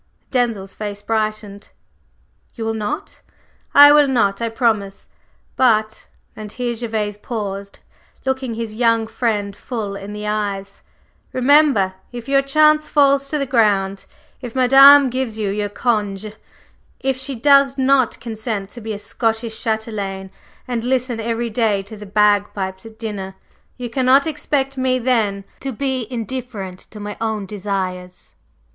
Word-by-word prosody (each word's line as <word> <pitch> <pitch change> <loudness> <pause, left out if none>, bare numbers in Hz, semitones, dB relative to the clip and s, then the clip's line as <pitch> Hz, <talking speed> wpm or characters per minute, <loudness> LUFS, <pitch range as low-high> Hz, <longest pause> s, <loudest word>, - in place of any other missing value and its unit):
Denzil's 230 -7 -1
face 205 -1 -6
brightened. 215 -2 -3 0.9
"You 225 - -5
will 225 - -1
not?" 210 -1 -5 0.5
"I 290 0 +10
will 295 -1 +6
not 220 -6 +1
I 230 - 0
promise! 220 -4 -1 0.5
But" 220 -4 +1 0.3
and 215 -1 -8
here 245 0 -2
Gervase 220 -3 -3
paused, 200 -4 -5 0.5
looking 260 -3 -2
his 225 -1 -4
young 230 0 +2
friend 215 -3 -2
full 210 -3 -5
in 200 +1 -8
the 210 0 -6
eyes, 200 -2 -3 0.5
"remember, 260 -7 +4 0.2
if 240 0 -8
your 275 0 +3
chance 305 +2 +3
falls 275 -1 +3
to 300 - -1
the 280 - -1
ground 200 -6 +1 0.3
if 245 -2 -8
Madame 270 +1 +7
gives 250 -3 -2
you 205 -3 -1
your 205 0 -2
congé 210 -2 -2 0.7
if 265 0 0
she 265 +1 -4
does 275 +2 +4
not 265 -2 +2
consent 220 -3 -4
to 240 - -9
be 220 0 -4
a - - -5
Scottish 225 +2 -2
châtelaine 205 -4 -3 0.4
and 240 -2 -2
listen 250 -1 0
every 230 +1 -2
day 215 -3 +1
to 200 +3 -9
the 210 -1 -10
bagpipes 205 -1 +1
at 220 -1 -15
dinner, 200 -4 -5 0.4
you 250 -1 -5
cannot 260 +3 +3
expect 275 -3 -1
me 255 0 +2
then 225 -6 0 0.2
to 270 - -4
be 260 -1 -2
indifferent 230 -6 -5
to 215 - -11
my 205 0 -6
own 220 -3 -2
desires. 185 -2 -5
225 Hz, 145 wpm, -19 LUFS, 205-255 Hz, 0.9 s, I